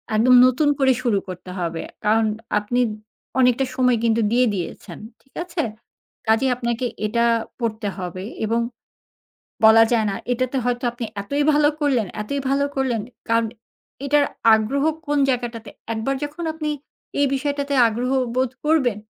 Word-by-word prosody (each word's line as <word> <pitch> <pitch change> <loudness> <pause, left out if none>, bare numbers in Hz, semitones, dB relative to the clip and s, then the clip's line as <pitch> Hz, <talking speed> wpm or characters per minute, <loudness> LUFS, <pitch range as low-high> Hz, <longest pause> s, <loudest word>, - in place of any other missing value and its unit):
একদম 250 +4 +5
নতুন 255 +4 +3
করে 265 -1 +4
শুরু 225 -5 +1
করতে 180 0 -8
হবে। 170 -2 -3 0.2
কারণ 220 +1 +3 0.3
আপনি 240 +4 -1 0.6
অনেকটা 250 +1 +3
সময় 250 -2 +3
কিন্তু 230 0 +2
দিয়ে 250 +1 +4
দিয়েছেন। 180 -4 -6 0.2
ঠিক 270 - -33
আছে? 350 -1 -3 0.7
কাজেই 225 +4 +3
আপনাকে 235 0 -2 0.2
এটা 235 +2 +1 0.3
পড়তে 220 -3 -2
হবে 185 0 -5 0.2
এবং 230 +2 +1 1.1
বলা 220 +1 +8
যায় 220 -2 +2
না, - - -3 0.2
এটাতে 255 +2 -1
হয়তো 245 0 -1
আপনি 240 -1 -5 0.2
এতই 285 +8 -1
ভালো 295 0 +4
করলেন, 260 -8 +1 0.2
এতই 280 +6 -3
ভালো 280 +1 +2
করলেন 255 -5 0 0.3
কারণ 230 0 +2 0.6
এটার 290 +1 +3 0.3
আগ্রহ 245 +6 0 0.2
কোন 290 0 +1
জায়গাটাতে, 240 -3 -2 0.2
একবার 225 +5 -1
যখন 305 +4 -6
আপনি 310 -1 -3 0.5
এই 285 - +4
বিষয়টাতে 285 +1 -2
আগ্রহ 240 +3 -2 0.3
বোধ 255 -1 +1 0.2
করবেন, 265 -9 +2
245 Hz, 145 wpm, -22 LUFS, 220-275 Hz, 1.1 s, বলা